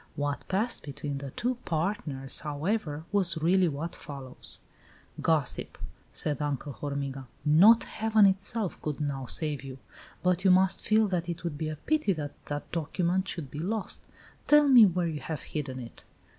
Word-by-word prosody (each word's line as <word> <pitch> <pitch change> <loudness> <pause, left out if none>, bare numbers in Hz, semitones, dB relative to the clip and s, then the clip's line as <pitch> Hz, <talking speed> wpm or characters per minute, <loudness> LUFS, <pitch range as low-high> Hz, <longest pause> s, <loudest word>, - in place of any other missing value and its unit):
What 145 0 -2
passed 210 +6 0
between 140 -1 -5
the 140 0 -6
two 245 - -2
PARTNERS, 155 -6 -2
however, 155 +1 -2
was 190 -5 +1
really 180 +3 +3
what 160 +3 -3
follows: 135 -3 -5 0.6
"Gossip!" 155 -6 0 0.3
said 150 -1 -2
Uncle 145 -1 -2
Hormiga, 140 -1 -4 0.2
"not 190 +10 +7
Heaven 220 -1 +3
itself 195 +1 0
could 150 -1 -3
now 140 -3 -2
save 150 -1 -2
you! 135 -1 -8 0.5
But 180 0 +2
you 195 - +5
must 185 +1 +4
feel 215 0 +3
that 180 -2 -1
it 170 0 -4
would 170 -4 -3
be 155 +1 -3
a 155 - -4
pity 300 - +1
that 150 -4 -4 0.2
that 145 0 -5
document 175 +3 0
should 160 -8 -5
be 150 - -6
lost. 205 +5 -3 0.4
Tell 295 0 +7
me 245 -6 +9
where 180 -1 0
you 160 -3 -2
have 155 +3 -5
hidden 140 -4 -4
it." 120 -2 -9
160 Hz, 165 wpm, -29 LUFS, 145-190 Hz, 0.6 s, me